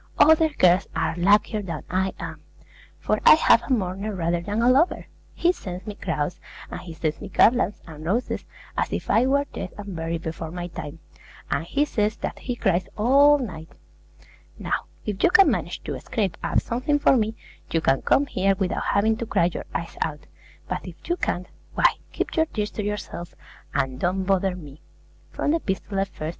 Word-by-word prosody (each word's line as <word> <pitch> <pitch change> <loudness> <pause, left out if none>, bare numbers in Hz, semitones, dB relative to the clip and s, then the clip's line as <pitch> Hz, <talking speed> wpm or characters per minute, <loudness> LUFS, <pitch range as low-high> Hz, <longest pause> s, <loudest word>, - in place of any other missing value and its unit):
Other 320 +1 +6
girls 185 - +3
are 160 - 0
luckier 210 +4 +3
than 170 -6 -5
I 190 +1 0
am; - - -7 0.6
for - - 0
I - - +9
have 240 -7 +5
a - - -7
mourner 200 -2 -1
rather 170 -1 0
than 205 +5 -1
a - - +4
lover. 275 +8 +3 0.3
He 345 - +3
sends 185 - -7
me 210 - -5
crowns, 170 -4 -3 0.3
and - - -5
he 175 - -9
sends 155 -1 -2
me 205 - -7
garlands 225 +2 +3
and 155 -2 -10
roses, 210 +10 -1 0.3
as - - -1
if - - -2
I 245 +3 +4
were 280 +1 +2
dead 185 - -6
and 200 -3 -7
buried 165 0 -3
before 160 0 -5
my 175 +1 -5
time, 155 -2 -7 0.5
and 160 - 0
he 285 - +1
says 215 -6 0
that - - -5
he 245 - -3
cries 185 -5 +1
all 280 +6 +6
night. 170 - -6 0.9
Now, - - -2 0.2
if 205 -1 -3
you - - +7
can 390 0 +6
manage - - -3
to - - -4
scrape 205 -7 -2
up - - +2
something 255 +5 0
for 285 - +4
me, 220 -2 0 0.3
you 165 - +1
can 135 -4 +2
come 285 - +3
here 195 -7 +1
without 190 +1 -1
having 220 +2 +2
to 230 - -4
cry 170 -3 +2
your - - -5
eyes 165 0 -4
out; 150 -2 -2 0.4
but - - -2
if - - -9
you 345 - +2
can't, 180 - -2 0.3
why, - - +2 0.3
keep - - -3
your 320 0 +3
tears 210 -7 -3
to 210 - -4
yourself, 200 -4 -5 0.4
and 130 -1 -1
don't 185 +4 0
bother 190 -1 +1
me! 150 -4 -11 0.5
From 290 - -1
the 330 - +3
'Epistolae,' 195 -3 -3
i. - - +3
36. 195 - -20
195 Hz, 195 wpm, -24 LUFS, 175-235 Hz, 0.9 s, I